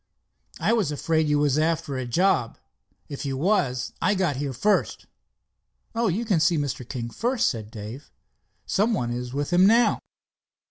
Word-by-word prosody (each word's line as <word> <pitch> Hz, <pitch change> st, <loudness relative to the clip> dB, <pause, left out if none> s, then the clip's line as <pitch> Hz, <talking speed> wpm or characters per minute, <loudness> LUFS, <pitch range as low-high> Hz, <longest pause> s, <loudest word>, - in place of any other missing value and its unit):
"I -, -, +2 dB
was 205 Hz, -10 st, +1 dB
afraid 160 Hz, +1 st, 0 dB
you 150 Hz, 0 st, +2 dB
was 145 Hz, 0 st, +2 dB
after 160 Hz, -3 st, 0 dB
a 130 Hz, -1 st, -3 dB
job. 170 Hz, -3 st, +1 dB, 0.5 s
If 140 Hz, -, -6 dB
you 135 Hz, -2 st, -3 dB
was, 130 Hz, -, 0 dB
I 205 Hz, +4 st, +2 dB
got 175 Hz, -8 st, 0 dB
here 140 Hz, 0 st, -2 dB
first." 205 Hz, -, 0 dB, 0.9 s
"Oh, 230 Hz, 0 st, +1 dB
you 210 Hz, +6 st, -1 dB
can 195 Hz, -7 st, +2 dB
see 165 Hz, +1 st, +3 dB
Mr. 135 Hz, -4 st, -3 dB
King 120 Hz, -3 st, -5 dB
first," 240 Hz, -, 0 dB
said 110 Hz, -4 st, -3 dB
Dave. 115 Hz, +5 st, -9 dB, 0.6 s
"Some 220 Hz, +3 st, +1 dB
one 120 Hz, -9 st, -2 dB
is 125 Hz, +1 st, -4 dB
with 145 Hz, +5 st, -3 dB
him 185 Hz, +2 st, +6 dB
now." 230 Hz, +3 st, +4 dB
150 Hz, 170 wpm, -25 LUFS, 125-190 Hz, 0.9 s, him